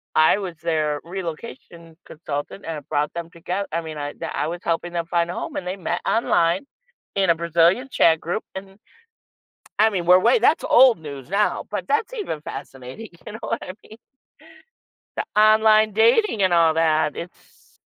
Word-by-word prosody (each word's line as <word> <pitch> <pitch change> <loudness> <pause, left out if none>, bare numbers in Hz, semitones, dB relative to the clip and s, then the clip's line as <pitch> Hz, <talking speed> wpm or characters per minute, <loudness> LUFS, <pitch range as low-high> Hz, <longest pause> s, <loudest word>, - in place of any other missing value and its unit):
I 155 +5 +5
was 185 -4 -5
their 155 -3 0
relocation 170 - -8
consultant, 150 +4 -6
and 165 - -4
I 150 - -8
brought 150 -1 0
them 170 -1 -6
togeth 180 +4 -4
I 170 +2 -1
mean, 160 -1 -8
I 145 0 -5
d - - -7
I 150 - -1
was 175 +2 -5
helping 170 +1 -2
them 170 -1 -2
find 170 0 0
a - - -5
home, - - -6
and 180 - -5
they 185 - -3
met 175 -1 -3
online 200 - +1 0.5
in 190 -3 +1
a - - +2
Brazilian 170 - +2
chat 160 -7 +4
group, 175 +6 -3
and 195 0 -9 1.0
I 220 - +6
mean, 180 -4 -2
we're 180 +1 +7
way 470 - +3
that's - - +3
old 250 -4 +6
news 140 -2 -9
now, 205 +2 0
but - - -4
that's 440 +2 0
even 395 - -4
fascinating, 135 - -9 0.2
you 210 - -8
know 220 - -8
what 230 - -2
I 185 - -7
mean. 220 - -14 1.2
The - - -2
online 215 0 +5
dating 225 - +3
and 185 -2 +2
all 165 -2 +4
that, 155 -2 +1
it's 175 +2 -12
170 Hz, 185 wpm, -22 LUFS, 160-210 Hz, 1.2 s, we're